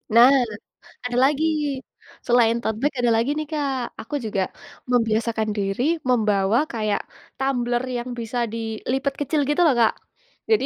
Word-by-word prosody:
Nah, 245 +3 +9 0.7
ada 245 0 -2
lagi. 300 +3 +2 0.8
Selain 235 -1 +4
tote 220 -2 -2
bag, 290 0 +1
ada 240 -1 +3
lagi, 230 +4 +1
nih, 310 - -2
Kak. 275 -5 -2
Aku 295 - -6
juga 195 -3 -1 0.4
membiasakan 225 -2 +1
diri 195 +4 -1 0.3
membawa 215 +2 +2
kayak 215 -2 0 0.4
tumbler 245 -2 0
yang 240 +1 -5
bisa 235 +1 -4
dilipat 230 +5 -2
kecil 290 0 +1
gitu, 295 +4 +2
loh, 285 - +4
Kak. 230 -2 +4 0.6
Jadi 440 - +3
240 Hz, 140 wpm, -23 LUFS, 220-270 Hz, 0.8 s, Nah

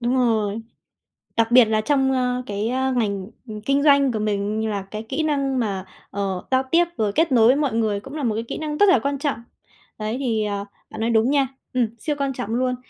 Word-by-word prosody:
Đúng 240 +1 0
rồi. 220 -3 +1 0.8
Đặc 230 0 +2
biệt 250 -1 +8
là 215 0 +1
trong, 270 +1 +2
a, 250 -1 0
cái, 205 +2 -2
a, 260 +1 0
ngành, 200 -6 -1 0.2
ừm, 215 -1 -7
kinh 275 +5 +1
doanh 280 -3 +5
của 215 - -2
mình 210 +1 -1
là 200 -2 -2
cái 215 +1 -5
kỹ 310 +4 -1
năng 275 -4 0
mà, 195 -4 -2 0.3
ờ, 195 -2 -3
giao 260 0 +3
tiếp 345 +1 +5
rồi 210 -2 +1
kết 325 -2 +2
nối 240 +2 +5
mọi 285 -5 0
người 215 -3 0
cũng 270 +6 -11
là 300 - -3
một 220 -3 0
cái 225 - -2
kỹ - - -6
năng 305 -1 -4
rất 410 +3 +5
là 260 - +5
quan 280 +3 -2
trọng. 285 -5 -1 0.6
Đấy, 215 +2 -2
thì, 225 -5 0
à, 200 -1 -3 0.2
bạn - - -7
nói 230 - +1
đúng 230 +3 +3
nha. 275 -2 +3 0.3
Ừm, 245 -3 +2
siêu 300 -2 -2
quan 275 -1 0
trọng 210 - -5
luôn. 255 0 0
240 Hz, 235 wpm, -22 LUFS, 215-270 Hz, 0.8 s, biệt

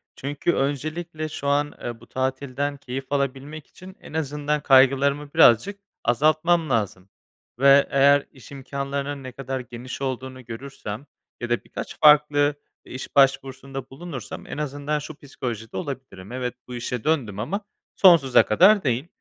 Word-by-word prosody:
Çünkü 145 +5 -1
öncelikle 155 +3 -3
şu 140 - -5
an, 145 +1 +1
eee, 120 -1 -5
bu 115 - -17
tatilden 135 +2 -2
keyif 135 0 -6
alabilmek 140 +2 -3
için 185 +1 -13
en - - -12
azından 150 -1 -1
kaygılarımı 140 +1 +4
birazcık 160 - +5 0.2
azaltmam 155 +6 +2
lazım. 100 -5 -1 0.5
Ve 140 +1 +6
eğer 140 +1 +4
iş 130 0 -16
imkânlarının 140 +1 -4
ne 130 - -7
kadar 135 +1 -5
geniş 125 +1 -8
olduğunu 130 -1 -5
görürsem 115 -1 -7 0.4
ya 120 - -4
da 120 - 0
birkaç - - -8
farklı 150 -1 +5 0.3
iş 130 +1 -8
başvurusunda 135 -1 +1
bulunursam 135 -4 -8
en - - -6
azından 150 0 -2
şu 150 +1 -8
psikolojide 120 -6 -6
olabilirim; 130 - -7
evet, 125 -1 -3
bu 125 - -7
işe 120 -1 -4
döndüm 125 -11 0
ama 200 - -2 0.3
sonsuza 165 -9 +6
kadar 190 - +5
değil. 130 +2 -1
140 Hz, 140 wpm, -24 LUFS, 130-150 Hz, 0.5 s, Ve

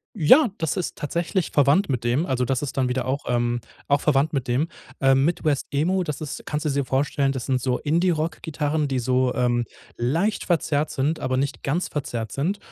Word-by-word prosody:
Ja, 235 - +6
das 160 +2 -1
ist 180 - -3
tatsächlich 170 +4 -2
verwandt 145 +7 +3
mit 125 -3 -1
dem, 120 +7 +1
also 125 -1 0
das 130 +2 -1
ist 140 - -4
dann 130 -2 +1
wieder 125 0 -1
auch, 135 +3 -2
ähm, 120 0 0 0.3
auch 145 0 +3
verwandt 145 +1 +2
mit 130 -3 -2
dem. 135 +7 +1 0.3
Ähm, 135 0 +4
Midwest 155 -4 0
Emo, 180 +6 +1
das 150 -3 -4
ist 150 - -5
kannst 150 +1 -2
du 150 - +1
dir 140 0 0
vorstellen, 135 +1 0
das 130 -3 -5
sind 130 -2 +1
so 125 0 0
Indie 170 +5 +1
Rockgitarren, 155 -2 -1
die 130 -1 -1
so, 125 +1 +1
ähm, 120 -1 +1 0.3
leicht 165 - 0
verzerrt 155 -3 0
sind, 145 +5 -1
aber 130 0 -1
nicht 140 +1 -2
ganz 165 +7 -1
verzerrt 120 -7 -4
sind. 180 +9 -1
140 Hz, 205 wpm, -24 LUFS, 130-160 Hz, 0.3 s, Ja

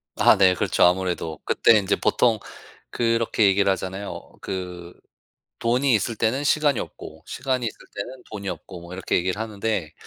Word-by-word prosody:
아 - - +5
네 95 -2 +6
그렇죠, - - +1
아무래도. 90 -3 +1
그때 115 - +5
이제 100 0 +1
보통 115 -4 +2 0.5
그렇게 115 -1 +1
얘기를 100 0 +4
하잖아요. 95 +1 -5
그 90 -2 -6 0.7
돈이 125 +3 +2
있을 110 +3 -1
때는 120 +6 0
시간이 145 -3 +2
없고 80 +1 -9
시간이 130 -2 -2
있을 - - -6 0.2
때는 125 +6 -6
돈이 100 -2 -5
없고 90 -2 -8
뭐 85 +1 -10
이렇게 95 - -2
얘기를 90 +3 -1
하는데 105 -6 -2
100 Hz, 345 characters per minute, -24 LUFS, 90-115 Hz, 0.7 s, 네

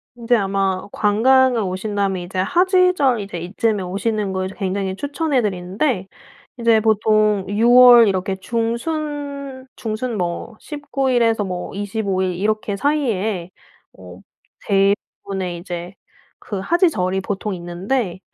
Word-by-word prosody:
인제 240 0 +1
아마 195 -2 -1
관광을 245 +3 +3
오신다면 195 0 -2
이제 185 +2 -6
하지절 355 - +3
이제 195 -3 -6
이쯤에 205 +4 -1
오시는 200 +2 -2
걸 185 0 -2
굉장히 190 0 -3
추천해 285 +4 -1
드리는데 190 +2 -1 0.5
이제 230 -2 +4
보통 215 -2 +2
6 225 +4 +2
월 245 -2 +9
이렇게 190 0 -1
중순, 280 +4 -4
중순 225 +1 -4
뭐 175 +6 -3
19 280 -3 -3
일에서 230 -3 +2
뭐 180 -2 -5
25 200 -1 -2
일 185 -1 -1
이렇게 210 +2 -1
사이에 220 - -1 0.5
어 - - -12 0.5
대부분의 195 -2 -1
이제 175 0 -7 0.4
그 205 -4 -6
하지절이 190 - +1
보통 205 +1 -3
있는데 185 +3 -3
210 Hz, 250 characters per minute, -20 LUFS, 190-245 Hz, 0.5 s, 월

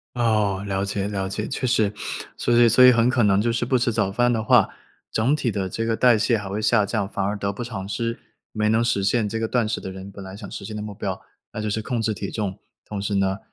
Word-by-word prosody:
哦， 105 -5 +1
了 95 0 -1
解， 100 0 -2
了 95 -2 -2
解， 105 +3 -3
确 135 - -3
实。 110 -5 +2 0.5
所 120 - +1
以 120 0 +6
所 125 +3 +7
以 125 - +9
很 120 0 +3
可 125 -2 +2
能 100 -1 +4
就 120 +2 +1
是 120 +1 -1
不 130 +1 +2
吃 120 0 +1
早 100 -3 0
饭 120 +3 +2
的 115 -2 0
话， - - +5 0.4
整 120 +7 +2
体 135 -5 -1
的 100 -2 -2
这 115 +5 -3
个 115 0 +1
代 125 -3 +5
谢 115 +2 +2
还 100 - -6
会 100 +3 -3
下 105 -1 +3
降， 100 -1 -2
反 100 - -2
而 100 +2 -1
得 100 -1 -2
不 105 +5 -6
偿 110 -5 -6
失， 115 +2 -2 0.3
没 105 -1 0
能 110 +2 +3
实 100 -4 +1
现 105 +2 +1
这 115 +2 -3
个 115 - -1
断 120 -1 +1
食 110 - -2
的 95 - -6
人， 95 +1 -9
本 100 0 -10
来 95 +1 -9
想 100 -3 -9
实 - - -7
现 110 +1 -6
的 105 - -4
目 105 -1 -6
标， 95 -1 -4 0.3
那 - - -6
就 110 - -2
是 105 +1 -1
控 120 +1 -2
制 110 0 0
体 100 -1 -5
重， 100 -3 -4 0.3
同 105 -2 -5
时 100 0 -2
呢， 95 0 +1
105 Hz, 295 characters per minute, -23 LUFS, 100-115 Hz, 0.5 s, 以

